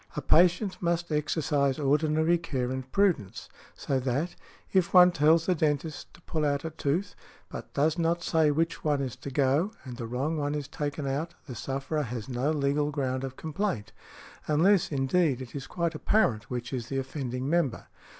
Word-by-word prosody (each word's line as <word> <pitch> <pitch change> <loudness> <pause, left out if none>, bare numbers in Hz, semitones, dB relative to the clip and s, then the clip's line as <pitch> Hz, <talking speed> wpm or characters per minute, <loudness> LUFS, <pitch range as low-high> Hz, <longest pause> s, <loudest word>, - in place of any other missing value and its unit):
A - - -2
patient 180 +3 +3
must 170 -1 -1
exercise 150 -2 +1
ordinary 155 +3 +2
care 130 -6 -2
and 130 0 -5
prudence; 180 - 0 0.3
so 135 - -1
that, 135 +7 -1 0.4
if 185 -1 +2
one 180 0 +9
tells 160 0 +4
the 185 - +3
dentist 155 -1 -1
to - - -19
pull 160 -2 -3
out 145 +1 0
a 160 - -3
tooth, 165 +5 -1 0.4
but - - -8
does 155 +4 +2
not 170 +1 +1
say 160 -3 +3
which 165 +3 0
one 150 -2 +1
is 130 -2 -3
to 135 - -7
go, 140 +8 +2
and 125 -3 -8
the 115 -2 -5
wrong 135 +7 -1
one 145 0 -1
is 145 -2 -4
taken 145 -1 -4
out, 150 +6 -2
the 130 - -7
sufferer 135 +6 -3
has 120 -4 -5
no 130 +2 -1
legal 145 -1 +1
ground 130 -3 -2
of 130 -1 -6
complaint, 155 - -3 0.6
unless, 170 +5 +3
indeed, 140 0 +1
it 130 -2 -8
is 140 -3 -6
quite 170 -1 -1
apparent 155 - +1
which 125 +1 -4
is 120 -3 -3
the 135 - -2
offending 130 -1 -3
member. 160 -5 0
150 Hz, 180 wpm, -28 LUFS, 135-165 Hz, 0.6 s, one